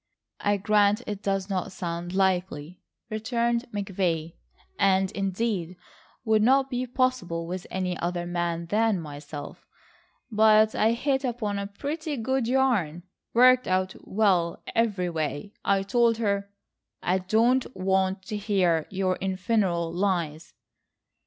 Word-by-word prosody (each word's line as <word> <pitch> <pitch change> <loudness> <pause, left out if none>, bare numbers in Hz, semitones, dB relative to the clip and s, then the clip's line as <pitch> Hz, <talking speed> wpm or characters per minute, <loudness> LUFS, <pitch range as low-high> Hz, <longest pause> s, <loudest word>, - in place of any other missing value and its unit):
"I 205 0 +1
grant 210 +2 +3
it 205 -1 -5
does 195 -2 -1
not 195 0 -2
sound 175 -1 -4
likely," 180 -4 0 0.3
returned 235 +2 0
McVay, 180 -5 -2 0.5
"and 190 -1 +3
indeed 195 -3 -2 0.5
would 220 -1 +3
not 265 +4 +3
be 250 0 -2
possible 245 -10 -1
with 180 +1 -5
any 185 -1 -2
other 175 0 -2
man 175 -1 -2
than 210 +2 +1
myself. 145 -1 -9 0.6
But 215 0 +5
I 220 +2 +3
hit 265 +3 0
upon 225 -5 -2
a 200 - -3
pretty 295 +8 -4
good 255 +1 0
yarn,—worked 245 - +2
out 185 0 0
well 190 -5 +1
everyway. 180 -5 -1
I 195 -1 +2
told 230 +2 +2
her—" 200 -3 -1 0.5
"I 185 +2 +2
don't 230 +7 +2
want 190 0 0
to 210 +2 -4
hear 185 -6 +1
your 185 -1 -1
infernal 185 -3 0
lies." 170 -4 -2
195 Hz, 120 wpm, -26 LUFS, 180-225 Hz, 0.6 s, But